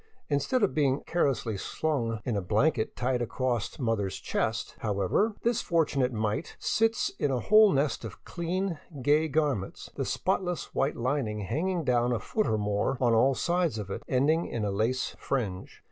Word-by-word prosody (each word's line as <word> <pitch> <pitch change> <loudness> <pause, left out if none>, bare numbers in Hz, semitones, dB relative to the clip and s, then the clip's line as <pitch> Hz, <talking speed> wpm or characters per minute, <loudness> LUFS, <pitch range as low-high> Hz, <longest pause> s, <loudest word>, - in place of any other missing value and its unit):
In 145 -1 +2
stead 245 - 0
of 200 - +2
being 140 -2 +2
carelessly 130 - 0
slung 115 -3 -2
in 120 - -1
a 100 - 0
blanket 110 - +1
tied 125 0 0
across 120 -1 -2
mother's 115 - -1
chest, - - -2
however, 105 - +1
this 235 -1 +2
fortunate 145 -6 +1
mite 110 +5 -2
sits 225 +1 +1
in 145 - +1
a 130 -2 0
whole 215 - +6
nest 140 -3 0
of 110 -3 -9
clean, 175 0 -2 0.2
gay 150 +4 +4
gar 150 -1 +2
ments, 95 -5 -7
the - - -2
spotless 180 -3 -1
white 135 +2 +1
lining 120 -4 -1
hanging 170 - -1
down 125 -2 +2
a 115 - 0
foot 215 - -1
or 110 - +1
more 105 +5 0
on 120 -3 +3
all 130 +4 +4
sides 175 -7 0
of 100 -2 -5
it, - - -4
ending 150 +6 +2
in 110 -3 -2
a 100 - 0
lace 115 +6 -1
fringe. 105 -9 -3
130 Hz, 175 wpm, -28 LUFS, 110-160 Hz, 0.2 s, whole